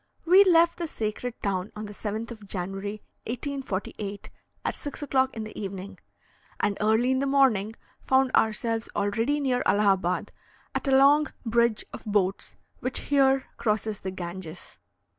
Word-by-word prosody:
We 370 +4 +8
left 340 -2 +4
the 340 - -2
sacred 225 -1 -4
town 195 -1 -1
on 215 0 -5
the 210 - -8
7th 220 +3 -4
of 215 -3 -10
January, 195 +3 -4 0.2
1848, 220 -5 -4 0.3
at - - -1
6 290 0 -6
o'clock 265 -3 +1
in 220 - -3
the 215 - -9
evening, 195 -1 -6 0.6
and 205 -1 +1
early 220 +4 +3
in 260 - +2
the 275 - 0
morning 235 -7 +3 0.3
found 265 0 +4
ourselves 225 0 +1
already 225 +8 +1
near 255 -3 +1
Allahabad, 195 -3 +2 0.4
at - - -3
a 265 -1 +5
long 290 +3 +5
bridge 235 -1 +2
of - - -8
boats 200 -2 0 0.2
which 255 0 -1
here 270 -1 +4
crosses 215 -1 -1
the 190 - -4
Ganges. 175 -2 -7
220 Hz, 150 wpm, -27 LUFS, 200-265 Hz, 0.6 s, We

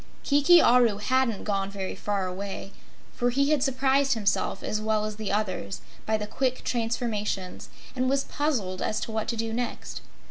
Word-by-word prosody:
Kiki 290 +5 +6
Aru 240 -6 +5
hadn't 245 0 +1
gone 195 -2 -1
very 195 -1 -4
far 200 -2 -2
away, 195 +1 -5 0.4
for 245 - +1
he 280 +4 +2
had 300 -3 +3
surprised 270 +1 +2
himself 205 -3 0
as 215 - -1
well 215 0 +1
as 215 -1 -5
the 215 -2 -3
others 185 - -2 0.3
by 220 0 +2
the 210 - -4
quick 255 +4 -1
transformations 225 -5 -2 0.3
and 255 0 +1
was 275 0 +2
puzzled 235 -12 -2
as 215 - 0
to - - -4
what 220 -1 -2
to 235 - -1
do 225 0 -2
next. 245 +1 -4
225 Hz, 175 wpm, -27 LUFS, 205-260 Hz, 0.4 s, Kiki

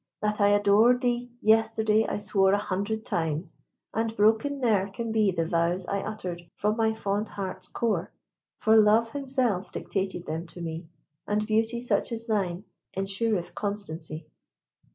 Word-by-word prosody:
That 210 0 -1
I 205 - +6
adored 205 +4 +5
thee 245 -1 0
yesterday 220 0 +3
I - - -2
swore 195 -1 +2
An 205 - +3
hundred 205 +2 -2
times; 160 +1 -2 0.4
and 225 0 -1
broken 220 +7 +3
ne'er 210 -6 +2
can 230 +3 -4
be 215 -2 +3
The 165 -3 0
vows 170 +2 0
I 200 +2 -1
uttered 185 -5 -5
from 210 +1 0
my 220 -1 +1
fond 205 0 -2
heart's 185 -2 -5
core; 210 -8 -1 0.5
For 220 0 +3
Love 220 +1 +5
himself 255 -10 -1
dictated 190 -3 -3
them 160 +2 -4
to 175 - -11
me, 165 0 -5 0.4
And 210 +1 0
beauty 225 +2 0
such 245 - 0
as 230 0 -2
thine 195 -5 -1 0.3
ensureth 195 0 -1
constancy. 175 -6 -4
210 Hz, 155 wpm, -27 LUFS, 185-225 Hz, 0.5 s, I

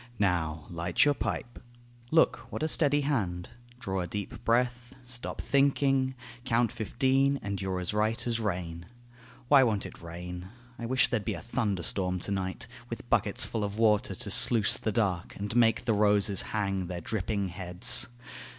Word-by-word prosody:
Now 80 -6 0
light 85 - +2
your 145 - +4
pipe; 120 -3 -4 0.5
look, 160 +3 +3
w'hat - - -4
a - - +2
steady 145 -2 +3
hand. 100 -12 -2 0.3
Draw 95 -6 -3
a 90 - -3
deep 105 +4 -6
breath; 120 +1 0
stop 120 0 -6
thinking; 135 -1 +2 0.3
count 120 -2 +1
fifteen, 130 +4 +1
And 100 0 -3
you're 95 -1 -2
as 90 +2 -2
right 110 +2 0
as 115 -1 0
rain.... 85 -5 -4 0.6
Why 140 0 +7
won't 110 -6 +1
it - - -9
rain?... 90 +2 -7 0.3
I 115 - -4
wish 130 +1 +3
there'd 120 -4 -1
be - - -2
a - - -6
thunder 105 -7 -2
storm 90 0 0
to 100 - -3
night, 95 -2 -3 0.2
With - - -8
bucketsful 110 - +2
of 100 +1 -3
water 105 -3 +2
to 110 -2 -5
sluice 110 +1 +3
the 110 - -2
dark, 95 -5 -1
And 105 +3 -4
make 115 0 +3
the 115 - +2
roses 105 -2 +3 0.2
hang 95 -3 -1
their 90 0 -5
dripping 100 +1 -2
heads. 90 0 +2
105 Hz, 170 wpm, -29 LUFS, 90-120 Hz, 0.6 s, Why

